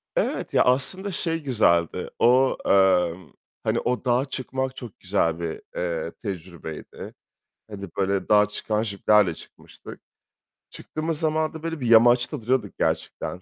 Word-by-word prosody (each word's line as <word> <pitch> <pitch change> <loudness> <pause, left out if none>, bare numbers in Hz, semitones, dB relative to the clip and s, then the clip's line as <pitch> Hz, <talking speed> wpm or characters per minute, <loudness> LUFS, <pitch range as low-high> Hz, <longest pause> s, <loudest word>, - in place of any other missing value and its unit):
Evet - - -1
ya, - - +5
aslında 185 +10 +2
şey 165 -2 -2
güzeldi. 85 - +1
O, 130 +2 +4
eee, 95 -3 +4 0.5
hani - - 0
o 125 +2 -2
dağa 125 +2 +2
çıkmak 130 -1 -4
çok 120 -6 -10
güzel 85 -3 0
bir, 85 -1 -4
eee, 85 -1 -3
tecrübeydi. 85 -5 -8 0.6
Hani 100 -2 -7
böyle 95 0 0
dağa 105 -1 +5
çıkan 105 +1 -2
jiplerle 105 -3 +2
çıkmıştık. - - -14 0.7
Çıktığımız 155 0 -4
zaman 155 -1 0
da 160 -1 -9
böyle 165 -1 -4
bir 125 - -3
yamaçta 120 +4 +4
duruyorduk 115 -3 -1
gerçekten, 90 - -2
115 Hz, 135 wpm, -24 LUFS, 95-130 Hz, 0.7 s, ya